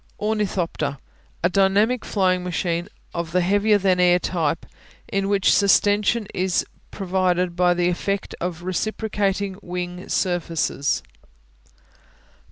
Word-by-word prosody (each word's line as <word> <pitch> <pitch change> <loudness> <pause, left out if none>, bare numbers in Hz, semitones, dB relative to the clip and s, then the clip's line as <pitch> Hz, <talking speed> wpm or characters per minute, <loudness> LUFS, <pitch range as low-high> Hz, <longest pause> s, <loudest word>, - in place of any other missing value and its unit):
Ornithopter 205 -9 -1 0.5
A 175 - +4
dynamic 200 +6 +3
flying 185 -3 +1
machine 175 -1 -2 0.2
of 170 -1 -4
the 180 - +3
heavier 205 +3 +3
than 190 -2 +2
air 180 0 +5
type, 165 -3 -1 0.4
in 195 0 -1
which 200 -1 +3
sustension 205 +2 +3
is 185 0 0 0.2
provided 180 -2 0
by 180 0 +3
the 175 0 +1
effect 195 +3 -2
of 175 -1 -3
reciprocating 200 0 -1
wing 180 0 -5
surfaces. 165 -5 0
185 Hz, 110 wpm, -23 LUFS, 175-200 Hz, 0.5 s, air